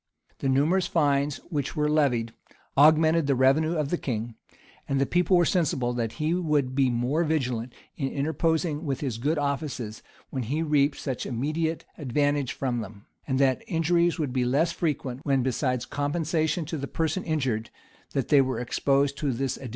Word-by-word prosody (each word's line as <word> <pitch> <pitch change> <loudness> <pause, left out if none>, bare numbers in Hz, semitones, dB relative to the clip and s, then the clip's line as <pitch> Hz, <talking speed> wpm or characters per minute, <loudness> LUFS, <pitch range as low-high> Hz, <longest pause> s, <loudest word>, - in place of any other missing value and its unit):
The 135 - 0
numerous 160 +7 +2
fines 145 -3 +1
which 145 -2 -2
were 150 -1 +1
levied, 130 -7 +1 0.4
augmented 155 +2 +5
the 140 - +3
revenue 145 +6 +3
of 150 -3 -1
the 175 - -1
king; 115 -2 -3 0.6
and 135 -1 +1
the 135 - +3
people 180 +4 +3
were 175 - +4
sensible 135 -9 +1
that 115 -2 -2
he 155 +1 -1
would 150 -7 0
be 135 -1 +3
more 125 +7 0
vigilant 125 -7 -1 0.2
in 135 -2 -2
interposing 160 +2 0
with 140 -4 -2
his 125 -6 -3
good 150 +6 0
offices, 140 -6 -3 0.3
when 130 - -2
he 145 +8 -1
reaped 145 -2 +2
such 130 -4 -4
immediate 155 +6 -2
advantage 145 0 0
from 125 -3 -2
them; 100 -1 -10 0.2
and 130 -2 0
that 135 -1 +2
injuries 170 +1 +2
would 145 -6 -2
be 130 -1 +1
less 140 +7 +2
frequent, 140 -7 -2
when, 135 -3 +2
besides 125 -1 -1
compensation 155 +2 -1
to 160 +2 -4
the 140 - -4
person 165 +5 -1
injured, 130 -9 -1 0.4
that 135 -4 -1
they 145 -2 +6
were 130 -1 -1
exposed 140 +3 +1
to 150 - -1
this 130 +1 -2
additional - - -14
penalty. 130 - -7
140 Hz, 180 wpm, -26 LUFS, 130-155 Hz, 0.6 s, they